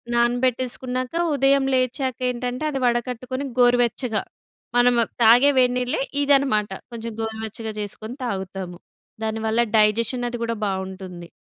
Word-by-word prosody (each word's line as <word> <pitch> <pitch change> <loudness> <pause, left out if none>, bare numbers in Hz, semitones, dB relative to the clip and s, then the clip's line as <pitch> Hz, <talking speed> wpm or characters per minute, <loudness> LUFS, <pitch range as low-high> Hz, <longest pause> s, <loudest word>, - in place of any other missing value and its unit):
నానబెట్టేసుకున్నాక, 250 +1 0 0.2
ఉదయం 275 0 +3
లేచాకేంటంటే, 255 0 -1
అది 270 -2 -3
వడకట్టుకొని, 250 +2 -1
గోరువెచ్చగా, 245 -1 +2 0.5
మనము 245 -1 +4 0.2
తాగే 245 +6 +7
వేడినీళ్ళే 250 +2 +1 0.2
ఇదనమాట. 270 -8 +2 0.2
కొంచెం 230 0 -5
గోరువెచ్చగా 220 0 -5
చేసుకొని 215 +4 -7
తాగుతాము. 190 -4 -5 0.5
దానివల్ల 220 +1 0 0.2
డైజెషన్ 230 +3 +2
అది 240 - -4
కూడా 230 0 -1
బావుంటుంది. 190 -2 -5
240 Hz, 100 wpm, -23 LUFS, 220-255 Hz, 0.5 s, తాగే